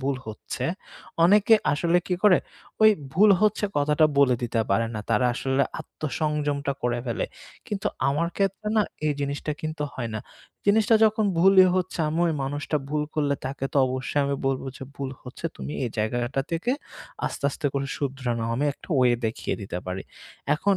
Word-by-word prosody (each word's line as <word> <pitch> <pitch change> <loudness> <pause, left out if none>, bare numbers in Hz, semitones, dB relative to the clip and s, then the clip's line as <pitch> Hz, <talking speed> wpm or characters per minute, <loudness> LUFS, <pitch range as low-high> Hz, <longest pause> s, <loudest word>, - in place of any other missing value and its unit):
ভুল 135 0 -1
হচ্ছে। 110 +3 -5 0.6
অনেকে 210 +4 +6 0.2
আসলে 170 +4 +2
কি 180 - 0
করে, 205 -5 +6 0.4
ওই 215 - +9 0.2
ভুল 205 +4 +6
হচ্ছে 215 0 +2
কথাটা 150 +2 +4
বলে 130 -3 +5
দিতে 115 -1 0
পারে 115 +3 +2
না। 105 - -3
তারা 115 +3 +3
আসলে 135 +2 +1 0.2
আত্মসংযমটা 145 -1 -2
করে 120 0 0
ফেলে। 115 - -1 0.4
কিন্তু 200 -2 -3 0.2
আমার 165 +5 +1
ক্ষেত্রে 195 +1 -1
না 215 - +5 0.2
এই 150 - +3
জিনিসটা 140 +2 -2
কিন্তু 155 -1 -4
হয় 120 -3 -3
না। 110 - -2 0.5
জিনিসটা 215 +2 +4
যখন 215 0 +3
ভুলই 190 +1 +7
হচ্ছে 185 -1 -2
আমি 160 +3 -1
ওই 165 - +1
মানুষটা 145 +2 -2
ভুল 150 0 0
করলে 145 -2 +1
তাকে 135 0 -4
তো - - -2
অবশ্যই 130 +3 -1
আমি 140 0 0
বলব 135 -1 0
যে - - -10
ভুল 135 -1 -4
হচ্ছে 125 +5 -11
তুমি - - -6
এই 120 - -2
জায়গাটা 120 +4 0
থেকে 170 +9 -1 0.6
আস্তে, - - -5
আস্তে, 145 - -3
করে 140 0 -1
শুধরানো। 130 -4 -2
আমি 140 +5 0
একটা - - -17
ওয়ে 125 -1 +5
দেখিয়ে 110 - -2
দিতে 95 -2 -4
পারি। 90 +1 -3 0.5
এখন 195 +3 +2
145 Hz, 175 wpm, -25 LUFS, 130-175 Hz, 0.6 s, ওই